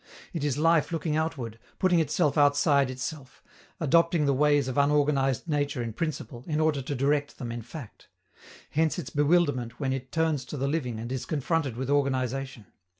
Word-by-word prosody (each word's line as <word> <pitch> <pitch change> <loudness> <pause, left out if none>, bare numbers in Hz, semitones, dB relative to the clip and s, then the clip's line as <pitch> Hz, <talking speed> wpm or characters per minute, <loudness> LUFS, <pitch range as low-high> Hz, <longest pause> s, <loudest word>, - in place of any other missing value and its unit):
It 165 -4 -3
is 145 -2 0
life 165 +1 +3
looking 160 -2 -1
outward, 135 -8 -3 0.2
putting 180 -2 +3
itself 155 -1 +1
outside 145 -1 +4
itself, 130 +1 -7 0.4
adopting 170 0 +3
the 140 - +3
ways 145 0 +3
of 130 - -3
unorganized 140 -1 +2
nature 145 -5 -1
in 115 -1 -5
principle, 140 -4 -4
in 155 -2 -1
order 155 -3 +2
to 140 +2 -4
direct 145 +2 0
them 120 -2 -5
in 120 0 -5
fact. 120 0 -11 0.6
Hence 160 +3 +1
its 170 -7 -5
bewilderment 145 -6 +1
when 135 -2 0
it 130 -1 -5
turns 160 -4 +1
to 145 - -6
the 135 +1 -1
living 135 -6 -2
and 120 +2 -6
is 130 -2 -4
confronted 145 -4 -1
with 130 +2 -2
organization. 130 -4 -1
145 Hz, 175 wpm, -27 LUFS, 130-155 Hz, 0.6 s, outside